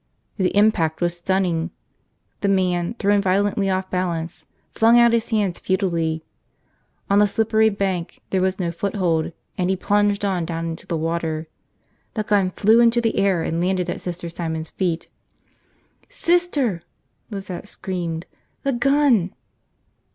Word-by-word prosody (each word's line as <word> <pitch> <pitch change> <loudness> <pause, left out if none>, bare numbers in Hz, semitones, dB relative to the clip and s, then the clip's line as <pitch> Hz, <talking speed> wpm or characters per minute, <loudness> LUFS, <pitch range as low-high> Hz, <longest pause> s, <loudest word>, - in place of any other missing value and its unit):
The 185 -3 +2
impact 190 -7 +3
was 175 -1 0
stunning. 175 -2 0 0.7
The 200 - 0
man, 185 0 +1
thrown 205 -1 +3
violently 200 +1 +1
off 185 0 -1
balance, 175 -3 -3 0.3
flung 230 +2 +5
out 235 -1 +6
his 230 -1 +1
hands 205 -6 0
futilely. 170 -5 0 0.8
On 200 0 +4
the 210 - +5
slippery 220 +1 +2
bank 190 -4 -2
there 190 - +2
was 190 0 +1
no 175 -3 -1
foothold, 175 -3 -1 0.3
and 180 0 +1
he 190 - +2
plunged 205 +1 +1
on 185 -3 0
down 165 0 -3
into 165 0 -6
the 165 - -1
water. 160 -1 -2 0.7
The 215 - 0
gun 205 -3 +2
flew 215 +5 +4
into 235 0 +5
the 230 -1 0
air 195 -4 +2
and 165 +1 -1
landed 180 -1 0
at - - -6
Sister 175 -1 -5
Simon's 160 -1 -4
feet. 175 -3 -2 1.0
"Sister!" 300 - +1 0.5
Lizette 195 -2 -6
screamed. 175 -5 -4 0.4
"The 275 - +1
gun!" 245 -7 +3
190 Hz, 145 wpm, -22 LUFS, 170-205 Hz, 1.0 s, out